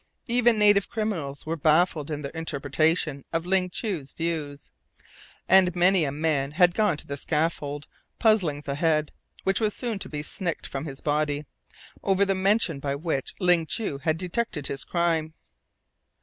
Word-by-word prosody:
Even 240 -1 +3
native 205 -1 +4
criminals 190 -12 -3
were 160 +1 -2
baffled 155 0 +2
in 150 -1 -4
their 140 - -5
interpretation 155 -1 0
of 165 +1 -1
Ling 185 0 +1
Chu's 175 - -3
views, 155 -4 -4 0.8
and 185 -1 +5
many 180 -1 +4
a 140 - -1
man 145 -2 0
had 175 +1 +5
gone 210 -6 +2
to - - -3
the 140 - -4
scaffold 150 -1 -2 0.3
puzzling 190 -11 +2
the 140 -1 -4
head, 155 0 +1 0.3
which 195 0 +1
was 215 -2 +1
soon 235 -5 -3
to - - -5
be 150 -1 -4
snicked 170 +1 -3
from 135 +2 -5
his 135 -3 -7
body, 150 0 0 0.6
over 195 0 +2
the 195 - +1
method 190 -6 +1
by 140 0 -1
which 145 -2 -3
Ling 175 -4 +3
Chu 150 -7 -2
had 155 +2 0
detected 180 -3 -3
his 135 - -3
crime. 165 -2 0
165 Hz, 165 wpm, -26 LUFS, 145-190 Hz, 0.8 s, and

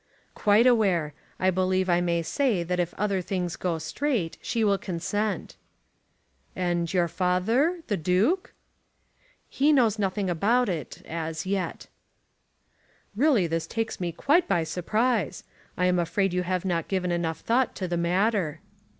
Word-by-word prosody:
"Quite 210 +2 +4
aware. 190 -11 +3 0.3
I 185 0 +3
believe 185 +1 +1
I 175 -1 +3
may 170 -1 0
say 225 - 0
that 180 +1 -2
if 175 -1 0
other 200 -2 0
things 180 -1 -3
go 175 -3 -2
straight, 200 - -2
she 230 - -1
will 200 -2 +2
consent." 205 +4 -3 1.0
"And 175 -2 -1
your 180 -2 +2
father 225 - +1
the 205 - -1
Duke?" 195 - +1 0.9
"He 290 +3 +2
knows 230 -7 +3
nothing 195 0 -1
about 210 +8 +2
it, 160 -8 -5
as 160 0 -4
yet." 190 -1 -2 1.3
"Really 250 - +3
this 165 0 -2
takes 225 -1 -3
me 175 -2 -2
quite 295 - +2
by 175 -4 +2
surprise. 215 - -1 0.3
I 180 - +2
am 180 -1 +2
afraid 190 +2 0
you 180 - +1
have 180 +1 -2
not 170 -3 -1
given 185 -2 -1
enough 170 -2 -2
thought 245 +2 +1
to 185 - -3
the 175 - -2
matter." 175 -2 +1
185 Hz, 150 wpm, -26 LUFS, 175-220 Hz, 1.3 s, Quite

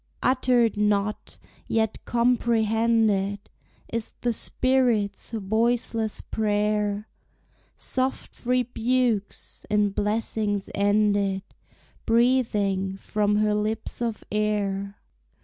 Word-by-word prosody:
Uttered 250 -4 +2
not, 210 0 0 0.3
yet 220 -1 0
comprehended, 225 -4 +2 0.6
Is 230 -1 -2
the 240 -1 +1
spirit's 240 -5 +1
voiceless 225 +1 0
prayer, 210 -1 -1 0.7
Soft 260 +1 -2
rebukes, 245 -3 0
in 210 -1 +2
blessings 210 -1 -1
ended, 200 -1 +2 0.6
Breathing 210 -6 +2
from 210 +1 0
her 210 0 +2
lips 215 +2 -2
of 230 -2 -2
air. 205 -2 -1
215 Hz, 80 wpm, -25 LUFS, 205-235 Hz, 0.7 s, Uttered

